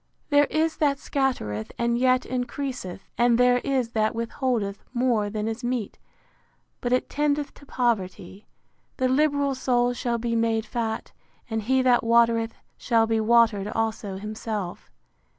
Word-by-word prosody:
There 290 0 +6
is 315 +1 0
that 285 -2 +2
scattereth, 255 - -2
and 235 0 +1
yet 255 +1 +3
increaseth; 250 -6 -4 0.2
and 240 -1 +4
there 250 0 +4
is 260 -3 -1
that 220 0 0
withholdeth 230 -3 -2
more 240 -4 +1
than 215 +1 -3
is 225 +2 -4
meet, 240 -4 -3 0.8
but 245 - -2
it 255 - +2
tendeth 295 0 -1
to 285 - -17
poverty. 200 -6 -2 0.5
The 260 - +2
liberal 285 +1 +2
soul 245 -2 +1
shall 240 -1 -1
be 230 0 -2
made 225 -1 +1
fat: 225 -2 -3 0.4
And 220 0 -1
he 260 +4 +2
that 250 -1 +4
watereth, 230 -1 +3 0.2
shall 230 -1 +3
be 225 0 +1
watered 220 -3 +3
also 215 -3 -2
himself. 210 -2 -5
235 Hz, 145 wpm, -25 LUFS, 220-255 Hz, 0.8 s, There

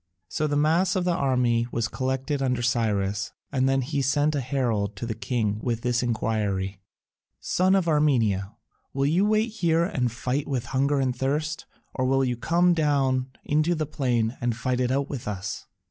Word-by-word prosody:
So 155 - -1
the 145 - -1
mass 165 +6 +2
of 185 -1 0
the 180 - +2
army 125 -5 +1
was 115 -1 -1
collected 130 +2 -2
under 125 -2 0
Cyrus, 105 -4 0 0.2
and 135 -1 +2
then 135 0 +2
he 135 +2 -2
sent 145 +3 +2
a 145 - 0
herald 115 -6 -1
to 95 - -5
the 115 - -2
king 110 -2 -1
with 115 -1 -2
this 120 -1 +1
enquiry: 105 -5 -1 0.6
"Son 185 +2 +2
of 190 -3 +1
Armenia, 115 - +2 0.4
will 135 0 0
you 175 +8 +3
wait 215 +2 +2
here 170 -6 +1
and 125 - -1
fight 125 +4 -2
with 130 -4 -2
hunger 140 +3 +1
and 130 -2 0
thirst, 150 +4 -2 0.3
or 130 - -1
will 135 +1 +2
you 125 -1 -1
come 175 +8 +2
down 135 -5 +1 0.2
into 155 +4 +2
the 155 -1 -1
plain 125 -5 0
and 120 -2 -1
fight 125 0 -1
it 125 -1 +1
out 140 +2 0
with 130 -7 -6
us?" 100 -1 -5
130 Hz, 185 wpm, -25 LUFS, 115-150 Hz, 0.6 s, you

